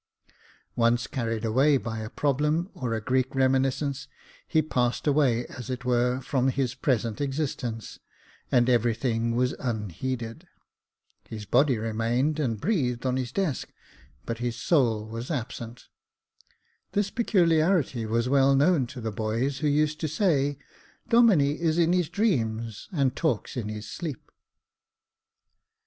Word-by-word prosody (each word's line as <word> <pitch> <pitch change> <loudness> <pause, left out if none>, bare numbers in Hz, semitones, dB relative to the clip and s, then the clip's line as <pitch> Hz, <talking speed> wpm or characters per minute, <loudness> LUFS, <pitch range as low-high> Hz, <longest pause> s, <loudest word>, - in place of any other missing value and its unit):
Once 120 0 +2
carried 115 -3 -3
away 135 +6 +4
by 115 -3 -5
a 110 0 -5
problem,, 150 - 0
or 120 -3 -3
a - - -1
Greek 130 +4 0
reminiscence, 135 +1 +1 0.4
he 160 - +2
passed 125 -6 0
away 135 -5 +2
as 130 -1 -9
it 125 0 -4
were, 125 +1 +2
from 130 0 0
his 130 -1 0
present 115 -5 -1
existence, 135 -6 -3 0.5
and 120 -1 +4
every 120 -2 +3
thing 115 -1 -1
was 125 +2 +1
unheeded. 115 - -4 0.8
His 110 -2 -6
body 130 +3 +3
remained, 115 +7 0
and 115 -8 -1
breathed 135 - 0
on 130 -1 +1
his 130 -2 -2
desk, 185 -10 -2 0.5
but 115 -1 -4
his 120 -1 -2
soul 115 -10 +1
was 115 +3 -6
absent. 120 -4 -5 1.1
This 205 -1 0
peculiarity 165 - +2
was 115 +2 0
well 135 +1 +4
known 145 -2 +3
to 125 0 -9
the 110 -1 -3
boys, 115 +6 -1
who 155 - 0
used 150 +1 +1
to 160 - -1
say, 145 -4 +1 0.5
"Domine 230 -8 +6 0.2
is 165 -1 +1
in 170 0 +3
his 180 -4 +1
dreams, 115 - -1
and 135 -7 +1
talks 155 -10 -1
in 115 -4 -3
his 105 -1 -6
sleep." 155 -1 -6
130 Hz, 140 wpm, -27 LUFS, 115-150 Hz, 1.1 s, Domine